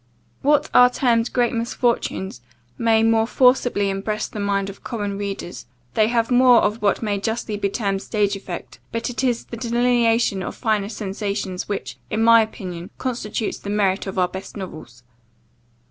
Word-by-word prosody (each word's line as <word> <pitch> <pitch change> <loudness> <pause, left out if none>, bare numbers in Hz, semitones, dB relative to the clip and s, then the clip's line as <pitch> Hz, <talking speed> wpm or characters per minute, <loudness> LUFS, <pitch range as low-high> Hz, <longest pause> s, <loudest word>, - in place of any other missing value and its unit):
What 295 +2 +3
are 250 0 +8
termed 235 -2 +1
great 245 -2 +1
misfortunes, 230 - -1 0.3
may 225 -1 +3
more 225 0 +3
forcibly 245 -6 +3
impress 210 +2 -2
the 215 - -8
mind 200 -1 0
of 195 - -10
common 205 -4 -3
readers; 195 -6 -5 0.3
they 215 +6 +3
have 230 +1 0
more 245 -1 +6
of 215 +2 0
what 205 +2 +1
may 205 -2 0
justly 220 0 -2
be 200 -1 -1
termed 195 -2 -1
stage 205 -2 0
effect; 190 -3 -8
but 230 +1 -2
it 245 - -3
is 245 -3 0
the 235 - -8
delineation 235 -3 +2
of - - -5
finer 215 -4 0
sensations, 200 -3 -4
which, 130 -11 -4
in 220 +1 0
my 230 0 +7
opinion, 185 -5 -6
constitutes 230 -4 -3
the 200 - -7
merit 200 -1 +1
of 195 - -5
our 180 -1 +3
best 190 +3 -8
novels. 155 -10 -9
215 Hz, 165 wpm, -22 LUFS, 195-235 Hz, 0.3 s, are